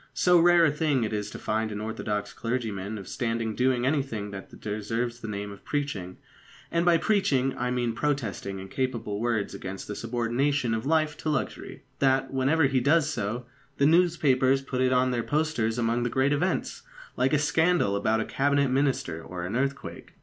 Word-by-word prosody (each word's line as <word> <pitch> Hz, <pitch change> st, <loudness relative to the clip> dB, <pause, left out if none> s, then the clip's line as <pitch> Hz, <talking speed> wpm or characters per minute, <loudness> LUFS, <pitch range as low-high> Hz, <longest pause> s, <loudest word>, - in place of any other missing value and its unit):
So 180 Hz, -1 st, +5 dB
rare 175 Hz, 0 st, +6 dB
a 155 Hz, -, +3 dB
thing 150 Hz, -4 st, +1 dB
is 105 Hz, -1 st, -2 dB
it -, -, -13 dB
to -, -, -6 dB
find 110 Hz, 0 st, -1 dB
an 105 Hz, -, -4 dB
orthodox 105 Hz, -1 st, -3 dB
clergyman 110 Hz, -4 st, -3 dB
of 100 Hz, -, -9 dB
standing 115 Hz, -2 st, -2 dB
doing 125 Hz, +1 st, +1 dB
anything 130 Hz, -8 st, -1 dB
that 95 Hz, -1 st, -9 dB
deserves 115 Hz, +3 st, -3 dB
the 115 Hz, -, -7 dB
name 100 Hz, -1 st, -4 dB
of 100 Hz, -, -12 dB
preaching 125 Hz, -12 st, -3 dB, 0.5 s
and 170 Hz, 0 st, +1 dB
by 175 Hz, -1 st, +5 dB
preaching 140 Hz, -10 st, +1 dB
I 125 Hz, +1 st, -2 dB
mean 120 Hz, -2 st, 0 dB
protesting 115 Hz, -8 st, -2 dB
in 95 Hz, 0 st, -7 dB
capable 115 Hz, -3 st, -2 dB
words 115 Hz, -3 st, -1 dB
against 95 Hz, 0 st, -7 dB
the 105 Hz, -, -5 dB
subordination 120 Hz, +3 st, 0 dB
of 115 Hz, +4 st, -2 dB
life 155 Hz, -1 st, +1 dB
to 155 Hz, -, -3 dB
luxury 150 Hz, -, -3 dB, 0.2 s
that, 135 Hz, -1 st, +2 dB
whenever 135 Hz, +5 st, +2 dB
he 135 Hz, -2 st, +3 dB
does 150 Hz, +4 st, +3 dB
so, 115 Hz, +3 st, -3 dB, 0.3 s
the 140 Hz, -, +3 dB
newspapers 145 Hz, -6 st, +3 dB
put 130 Hz, -1 st, -2 dB
it 130 Hz, 0 st, +3 dB
on 130 Hz, 0 st, +3 dB
their 120 Hz, -1 st, 0 dB
posters 145 Hz, -6 st, 0 dB
among 120 Hz, 0 st, +1 dB
the 120 Hz, -, 0 dB
great 135 Hz, +3 st, +2 dB
events, 180 Hz, +6 st, -1 dB, 0.3 s
like 130 Hz, +1 st, +1 dB
a 150 Hz, -, +4 dB
scandal 155 Hz, -, +2 dB
about 110 Hz, +2 st, +1 dB
a -, -, -2 dB
Cabinet 140 Hz, -1 st, +1 dB
Minister 130 Hz, -, 0 dB
or 90 Hz, -1 st, -6 dB
an 95 Hz, +5 st, -4 dB
earthquake. 135 Hz, +2 st, -3 dB
125 Hz, 185 wpm, -27 LUFS, 110-145 Hz, 0.5 s, rare